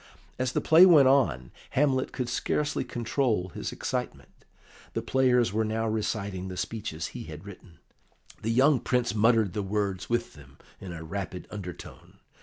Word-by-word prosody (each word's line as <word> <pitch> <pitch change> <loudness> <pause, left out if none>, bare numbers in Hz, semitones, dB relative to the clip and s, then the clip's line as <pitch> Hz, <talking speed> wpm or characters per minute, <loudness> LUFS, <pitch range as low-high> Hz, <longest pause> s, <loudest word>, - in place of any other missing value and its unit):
As 130 0 -1
the - - +1
play 160 +3 +7
went 150 -7 +7
on, 130 - +2 0.3
Hamlet 135 -2 +2
could 125 - -3
scarcely 145 +4 -1
control 120 -5 -1
his - - -5
excitement. - - -4 0.6
The - - -2
players 125 -5 +2
were 110 +1 +1
now 110 +1 -1
reciting 100 -3 -2
the 90 -1 -7
speeches 100 -6 -4
he - - -7
had 80 +3 -9
written; 95 -4 -13 0.6
the 110 - -2
young 130 +4 +4
Prince 125 -2 0
muttered 110 -3 +3
the 105 - -2
words 100 -2 -2
with 120 0 -1
them 70 -3 -16 0.2
in 95 - -8
a 80 -1 -7
rapid 90 +1 -5
undertone. 90 -5 -9
110 Hz, 160 wpm, -28 LUFS, 95-125 Hz, 0.6 s, play